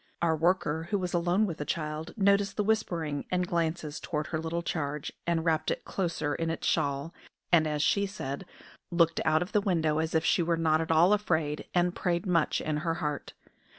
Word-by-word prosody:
Our 165 -1 +2
worker, 165 -1 +1
who 205 - +1
was 180 -2 -3
alone 175 +4 +2
with 170 -6 -4
the - - -1
child, 155 +2 -4
noticed 200 0 +3
the 210 - +2
whispering 170 -9 -1
and 180 0 +1
glances 165 -2 -1
toward 150 -2 -3
her 155 - +1
little 165 +1 -3
charge, 150 -3 -3
and 165 -1 +1
wrapped 160 -2 +1
it - - -3
closer 165 -5 -2
in 165 +1 -2
its 165 - -3
shawl, 140 +3 0 0.4
and, 160 -3 +5
as 150 -1 0
she 200 0 +2
said, 175 -4 -5 0.4
"looked 170 -2 +2
out 155 +2 +3
of 180 - -10
the 210 - +3
window 160 -6 +1
as 160 0 -1
if 160 0 +2
she - - +3
were 170 0 +1
not 160 -1 +2
at 160 - -4
all 165 +5 +5
afraid, 160 -7 0
and 175 0 +2
prayed 175 +1 -1
much 170 -4 +1
in 155 -1 -1
her 165 +1 -1
heart." 150 -5 -4
165 Hz, 205 wpm, -29 LUFS, 155-180 Hz, 0.4 s, and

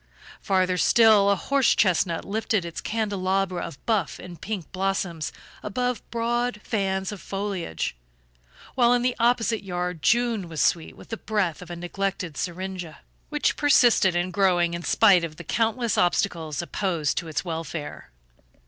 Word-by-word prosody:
Farther 185 -2 +1
still, 215 0 +5
a 200 - +4
horse 275 +6 +2
chestnut 175 -3 +1
lifted 215 -2 -1
its 170 - -6
candelabra 195 -4 -1
of 140 - -8
buff 210 -9 0
and 175 -3 -11
pink 200 -7 -5
blossoms 185 -4 -2 0.3
above 245 +4 -2
broad 240 0 -1
fans 190 -3 -1
of 205 - -8
foliage; 195 - -3 0.8
while 245 -1 +4
in 245 0 +2
the 250 0 +1
opposite 230 -2 +2
yard 180 -3 -3
June 230 -5 +1
was 160 -2 -5
sweet 165 -2 +1
with - - -14
the 225 - -4
breath 200 -8 -1
of 180 - -10
a 175 - -5
neglected 180 -1 -3
syringa, 180 -2 -5 0.3
which 295 -1 +1
persisted 245 - +4
in 175 +1 0
growing 180 -3 +2
in 170 - -3
spite 180 0 +5
of 160 -2 -5
the 170 - -9
countless 230 +4 0
obstacles 170 -3 0
opposed 170 -5 -1
to 170 - -8
its 155 +3 -3
welfare. 160 -2 -5
190 Hz, 150 wpm, -25 LUFS, 175-220 Hz, 0.8 s, still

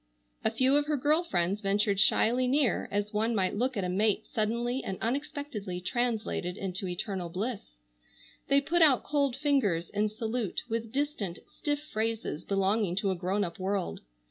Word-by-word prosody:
A - - +3
few 265 +2 +4
of 290 0 +1
her 300 -1 +1
girl 300 +5 +3
friends 190 - 0
ventured 200 0 +1
shyly 245 +5 +4
near, 270 -2 +2
as 205 +1 -2
one 225 +2 +1
might 190 -2 +1
look 250 +2 0
at 195 - 0
a - - 0
mate 210 +4 +1
suddenly 235 +4 0
and 190 - -4
unexpectedly 265 - -3
translated 220 -3 -1
into 190 0 -3
eternal 180 -1 -3
bliss. 195 - -4 0.7
They 280 0 +4
put 345 +5 +1
out 285 -6 +6
cold 280 -4 +1
fingers 260 - +1
in 210 +1 +1
salute 220 -1 -3
with 230 -1 -3
distant, 265 - -2
stiff 290 0 -3
phrases 220 -7 -2
belonging 195 -1 +1
to 195 0 +1
a - - -1
grown 190 +3 0
up 170 -2 -5
world. 190 - -2
215 Hz, 170 wpm, -29 LUFS, 195-255 Hz, 0.7 s, out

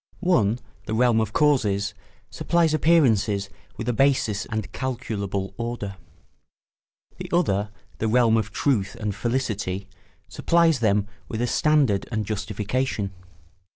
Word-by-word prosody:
One—the 115 - 0
realm 120 -1 +3
of 110 -2 -2
causes—supplies 145 - 0
appearances 110 -12 +3 0.3
with 115 - -5
a 120 - +1
basis 120 -5 +1
and 110 -4 -4
calculable 100 -7 -3
order; 115 -4 -4 1.2
the - - -7
other—the 105 - -1
realm 115 0 +4
of 110 -1 0
truth 120 -4 0
and 105 -2 -2
felicity—supplies 120 - -1
them 105 -3 +2 0.2
with 110 - -4
a 120 - +1
standard 135 -6 +2
and 110 -2 -1
justification. 105 +1 -2
110 Hz, 105 wpm, -24 LUFS, 100-130 Hz, 1.2 s, realm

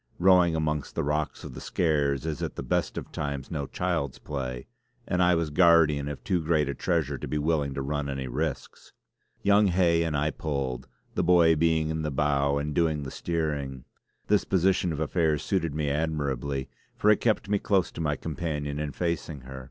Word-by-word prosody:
Rowing 90 -2 +5
amongst 75 -2 -2
the - - 0
rocks 75 0 -2
of - - -8
the - - -8
Skares 75 -4 0
is 80 -3 -3
at - - -3
the - - -5
best - - -1
of - - -6
times 70 -2 -4
no 70 -4 -3
child's 85 -7 -2
play, 65 -4 -5 0.4
and 90 - +1
I 90 0 +5
was 80 -2 -1
guardian 80 -4 +4
of 75 -1 -6
too 90 -4 0
great 80 -2 +1
a 70 - -1
treasure 75 -6 -1
to - - -5
be 75 - -2
willing 75 -3 0
to 70 - -2
run 75 0 -2
any 70 -1 -3
risks. 75 +3 -4 0.5
Young 100 +1 +5
Hay 85 -2 +3
and 80 -3 0
I 75 +2 +1
pulled, 70 -5 -3 0.3
the - - 0
boy 85 -2 +5
being 80 0 +2
in 80 0 -2
the 75 - -1
bow 70 0 +1
and 75 +1 -2
doing 80 -2 +1
the 65 - -6
steering. 75 -6 -3 0.4
This 105 -1 +3
position 95 -1 +2
of 75 - -4
affairs 80 -1 +1
suited 85 -6 -1
me 75 -2 0
admirably, 70 -3 -2 0.3
for 105 - +4
it 105 - +2
kept 110 -3 +1
me 100 0 +1
close 95 -4 +1
to - - -6
my 75 -2 0
companion 75 -2 -3
and 75 -3 -4
facing 85 -4 -2
her. 65 +1 -9
75 Hz, 200 wpm, -27 LUFS, 70-85 Hz, 0.5 s, Rowing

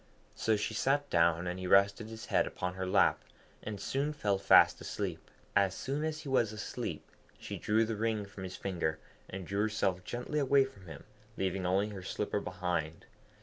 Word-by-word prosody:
So 110 - +1
she 105 - -2
sat 145 +2 +1
down, 85 0 +3
and 90 +1 -3
he 95 - -4
rested 100 +3 +4
his 110 0 -8
head - - +2
upon 90 0 -3
her 95 0 -4
lap, 95 - +3 0.4
and 105 -2 -5
soon 140 +7 -1
fell 100 -9 0
fast - - +6
asleep. - - -4 0.3
As 95 -1 +3
soon 140 +3 -2
as 155 0 -2
he 155 - -10
was 125 -5 +2
asleep, 105 -2 -5 0.3
she - - -6
drew 110 +2 +2
the 110 0 -2
ring 110 -1 -1
from 100 -1 -10
his 95 -1 -6
finger, 85 -5 -2 0.3
and 95 -1 -6
drew 100 +3 -1
herself 100 -4 0
gently 125 +8 -3
away 140 -1 +4
from 100 -9 -13
him, 80 -4 -9 0.3
leaving 95 -1 -1
only 100 +3 +2
her 100 -2 -7
slipper 105 +2 -2
behind. 90 -4 -3
100 Hz, 190 wpm, -32 LUFS, 90-115 Hz, 0.4 s, fast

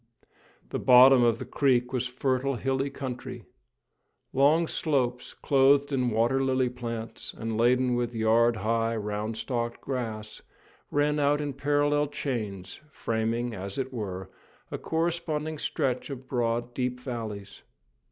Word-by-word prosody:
The - - -3
bottom 130 +1 +7
of 115 -1 +3
the - - -6
creek 125 -2 +1
was 125 -1 0
fertile, 130 +1 -1
hilly 135 +3 -1
country. 130 -3 -6 0.9
Long 150 +5 +4
slopes, 125 -7 -1
clothed 140 +1 +3
with 135 -2 +1
water 120 +5 +2
lily 130 -1 +1
plants, 115 -2 -6
and 115 0 -3
laden 125 +2 +3
with 120 -1 -1
yard 115 +1 +3
high, 115 +2 0
round 105 +1 -3
stalked 120 -1 -3
grass, 110 -5 -5 0.5
ran 150 +1 +1
out 145 0 +3
in 145 -2 -3
parallel 145 +1 +1
chains, 110 -10 -4
framing, 115 -2 -2
as 100 0 -5
it 130 -1 -3
were, 95 -5 -5 0.4
a - - -4
corresponding 160 -2 -2
stretch 135 -5 -1
of 130 -2 -7
broad, 120 -1 -1
deep 125 0 -2
valleys. 110 -6 -6
125 Hz, 130 wpm, -27 LUFS, 115-140 Hz, 0.9 s, bottom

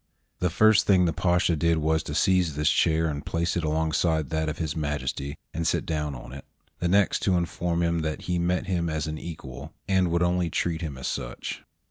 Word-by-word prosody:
The 90 - +1
first 110 +4 +4
thing 95 -3 +5
the 85 - +1
Pasha 90 -1 +2
did 85 +1 +2
was 80 +1 +1
to 75 - -4
seize 90 -3 +2
this 75 +2 +2
chair 80 -1 +2
and 75 -2 -3
place 85 +1 -1
it 85 - -1
alongside 80 0 0
that 80 -1 0
of 75 - -4
His 80 -3 -3
Majesty, 70 -2 -3 0.2
and 80 0 -1
sit - - 0
down 75 -3 -2
on 60 - -10
it; 70 - -8 0.4
the 90 - 0
next 100 +2 +3
to 95 - +1
inform 85 0 -1
him 85 0 +1
that 80 -1 -3
he 90 -1 -1
met 90 +1 0
him 85 -3 -1
as 80 0 -2
an 80 0 -4
equal, 70 -7 -8
and 95 -2 +2
would 85 +1 +1
only 90 -1 +1
treat 80 +1 -1
him 75 -5 -4
as 65 - -7
such. - - -4
80 Hz, 215 wpm, -26 LUFS, 75-90 Hz, 0.4 s, thing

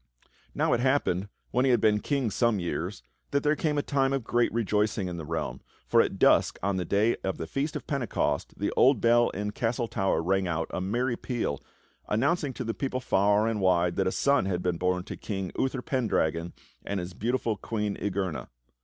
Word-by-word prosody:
Now - - +2
it 120 - +2
happened, 120 -8 +1 0.2
when 125 - +2
he 135 - +3
had 120 - +4
been 105 -1 +3
king 135 -2 -1
some 115 -1 +2
years, 85 -7 -3 0.3
that 140 0 0
there 150 0 +3
came 150 -1 0
a 145 - +1
time 135 -1 +1
of 135 -3 -1
great 120 +1 +1
rejoicing 105 -3 0
in 90 -1 -5
the 80 - -6
realm, 80 -1 -3 0.2
for - - +5
at - - -2
dusk - - +4
on 100 -1 +1
the 90 - -2
Day 105 +4 +2
of 95 - -2
the - - -4
Feast 140 - -2
of - - -5
Pentecost 140 -8 -1
the - - -1
old 130 -2 +5
bell 120 +1 +4
in 105 +2 -4
the - - -7
castle 120 +1 -1
tower 95 -7 0
rang 95 +2 +1
out 85 -1 -2
a - - -2
merry 120 +6 0
peal 115 - -3 0.5
announcing 140 +6 +1
to - - -5
the 115 - -2
people 130 0 -2
far 105 -2 +2
and 110 -3 -1
wide 90 -2 +3
that 95 - +2
a - - +1
son 140 -1 +2
had 90 -2 -1
been 90 -2 0
born 90 0 0
to - - -7
King 95 -4 -4
Uther 130 -1 -1
Pendragon 85 - 0 0.3
and 100 -1 -2
his 90 0 -6
beautiful 115 +2 -1
Queen 105 0 -3
Igerna. 95 -5 -2
105 Hz, 210 wpm, -28 LUFS, 95-125 Hz, 0.5 s, for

